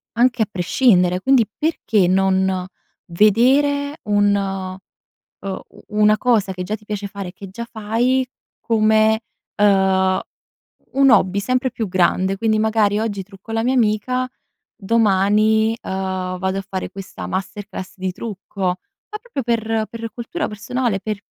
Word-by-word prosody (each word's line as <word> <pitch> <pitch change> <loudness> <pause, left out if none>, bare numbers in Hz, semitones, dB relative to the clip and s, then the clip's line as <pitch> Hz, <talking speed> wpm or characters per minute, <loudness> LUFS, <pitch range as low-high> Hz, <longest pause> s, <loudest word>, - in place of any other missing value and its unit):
anche 240 0 +3
a - - -4
prescindere, 180 -1 +2
quindi, 260 0 +4
perché 225 - +1
non 190 0 +1 0.4
vedere 270 - +3
un 205 -1 +3
uhm, 190 -1 -5 0.6
u - - -17
una 210 0 +3
cosa 220 -5 +2
che 180 0 -5
già 210 +4 -2
ti 215 - -16
piace 205 -1 -4
fare, 195 -2 -7
che 195 0 -10
già 235 +5 -6
fai, 240 +4 0 0.3
come, 220 0 +3 0.4
uhm, 190 -2 +3 0.7
un 275 0 +5
hobby 190 -1 +4
sempre 255 +4 0
più 225 -2 -3
grande. 185 +1 +1
Quindi 215 +1 +1
magari: 215 -1 +2
"Oggi 205 -3 -2
trucco 195 +3 -13
la 225 0 0
mia 255 +2 +1
amica, 250 +2 +1 0.5
domani, 215 +1 +3
uhm, 185 -1 -3
vado 190 +1 -1
a 195 - -8
fare 190 -1 -4
questa 195 -1 -8
masterclass 190 0 -5
di 185 0 -2
trucco." 200 0 -8
Ma 185 - -4
proprio 465 - -5
per 225 -2 0
per 230 -1 -6
cultura 250 +8 -3
personale, 230 0 -2
per 215 -1 -3
210 Hz, 140 wpm, -20 LUFS, 190-230 Hz, 0.7 s, un